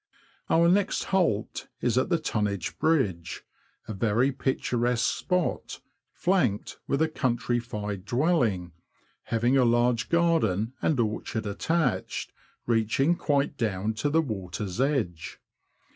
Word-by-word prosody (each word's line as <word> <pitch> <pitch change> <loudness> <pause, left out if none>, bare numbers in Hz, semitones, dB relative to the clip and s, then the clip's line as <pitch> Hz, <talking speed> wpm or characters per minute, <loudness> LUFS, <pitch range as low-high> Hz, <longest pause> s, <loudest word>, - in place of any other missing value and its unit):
Our 170 +1 +4
next 190 +3 +2
halt 165 - 0
is - - 0
at - - +1
the - - +3
Tonnage 100 -3 -2
Bridge, 110 - 0 0.4
a 110 - -4
very 115 +6 +2
picturesque 125 -3 0
spot, 180 -2 -2 0.3
flanked 145 - 0
with 140 +3 +2
a - - +2
countrified 120 -7 -2
dwelling, 120 - +1 0.5
having 120 +4 +2
a 130 - +5
large 120 -1 +2
garden 130 - +2
and 150 -5 +1
orchard 110 0 -2
attached, 160 +11 -1 0.3
reaching 120 +8 +2
quite 145 -3 0
down 105 -2 -1
to 145 - +1
the 160 +2 +3
water's 100 - -4
edge. 115 - -1
120 Hz, 115 wpm, -27 LUFS, 105-150 Hz, 0.5 s, a